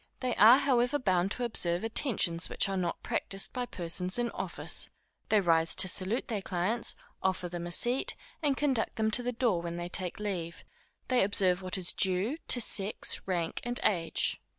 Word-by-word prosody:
They 250 -2 -2
are 230 +4 +8
however 260 -1 +1
bound 185 -7 0
to 250 - -5
observe 175 -6 0
attentions 215 - +2
which - - +1
are 195 - -3
not 180 -2 -3
practised 195 0 -1
by 250 -1 -3
persons 180 +1 0
in 240 -1 -1
office. - - -1 0.4
They 215 - +4
rise 165 -3 +2
to 190 - +6
salute 190 +6 +2
their 215 -4 -3
clients, 190 +6 -2 0.3
offer 185 -1 -1
them 175 0 -6
a - - -7
seat, 240 +9 +1 0.3
and 285 -4 0
conduct 265 -6 0
them 220 0 0
to 245 - +3
the 245 0 -2
door 230 -8 0
when 170 0 -5
they 175 0 -5
take 180 +1 -4
leave; 180 -5 -5 0.4
they 250 -4 +3
observe 190 -2 +2
what 185 +1 -3
is 180 -2 -3
due 190 - 0
to 245 - +5
sex, 210 -2 0
rank, 170 -3 -2
and 245 0 -3
age. 170 -6 0
195 Hz, 185 wpm, -30 LUFS, 175-240 Hz, 0.4 s, are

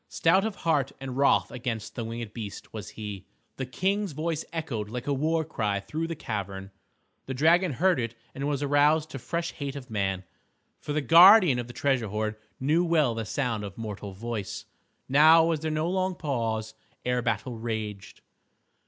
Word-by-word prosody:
Stout 185 +4 +3
of 220 -3 -2
heart 145 -5 +2
and 130 -2 -6
wroth 140 +1 +3
against 115 -4 -4
the 120 - -4
winged 115 -1 -6
beast 105 -4 -8
was 105 -2 -6
he. 105 -4 -6 0.3
The 130 - -3
King's 195 +6 -1
voice 160 +1 -2
echoed 130 -11 -3
like 120 +2 -5
a 145 - 0
war 160 +3 0
cry 105 -9 -1
through 155 +11 -4
the 165 - -4
cavern. 100 -6 -5 0.6
The 130 - -3
dragon 165 +4 +4
heard 180 +2 +2
it 115 -1 -3 0.2
and 140 +1 -3
was 145 -1 -1
aroused 150 +2 +3
to 135 - -6
fresh 170 +6 -3
hate 140 -1 -5
of 130 -4 -9
man. 95 -3 -1 0.6
For - - -6
the 150 +1 0
guardian 170 - +8
of 120 - -4
the 120 - -9
treasure 130 -3 0
hoard 105 +1 -2 0.2
knew 155 +6 +2
well 155 -8 +2
the 115 -1 -4
sound 115 -3 -2
of 100 -2 -7
mortal 105 -3 -6
voice. 105 -1 -5 0.4
Now 160 +4 +7
was 165 -2 +1
there 160 +1 -2
no 155 +1 0
long 185 0 0
pause 115 -8 -2 0.3
ere 125 0 +1
battle 120 0 -2
raged. 110 -3 -5
130 Hz, 180 wpm, -27 LUFS, 110-160 Hz, 0.6 s, guardian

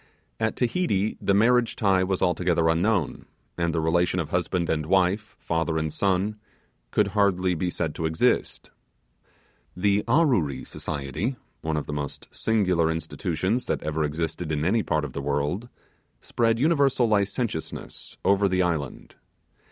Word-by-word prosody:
At 110 - 0
Tahiti 120 - 0
the 100 - +2
marriage 120 +3 +3
tie 95 -3 +2
was 95 0 0
altogether 85 -2 +2
unknown; 90 +1 0 0.3
and 85 -1 0
the 80 - -1
relation 85 +3 +1
of 80 -4 -3
husband 90 -1 0
and 75 -1 -1
wife, 95 +3 +1
father 80 -1 -1
and 80 -1 -2
son, 100 +2 0 0.5
could 105 -2 +2
hardly 95 -3 +2
be 90 +1 -1
said 80 -3 -2
to 80 - -2
exist. 80 0 0 1.1
The 100 +2 +2
Arreory 115 - +2
Society 75 - -4 0.3
one 80 -1 -1
of 75 - -2
the 75 - -5
most 70 -1 -5
singular 90 -7 +1
institutions 90 +7 -2
that - - -1
ever 75 +1 -1
existed 80 +2 -3
in 75 0 -1
any 110 +6 +3
part 80 -6 0
of - - -8
the 70 - -4
world 75 - -1 0.5
spread 115 -1 +1
universal 140 -4 +3
licentiousness 100 -3 -2
over 100 0 +4
the 95 0 +2
island. 80 -6 -3
90 Hz, 145 wpm, -25 LUFS, 80-105 Hz, 1.1 s, over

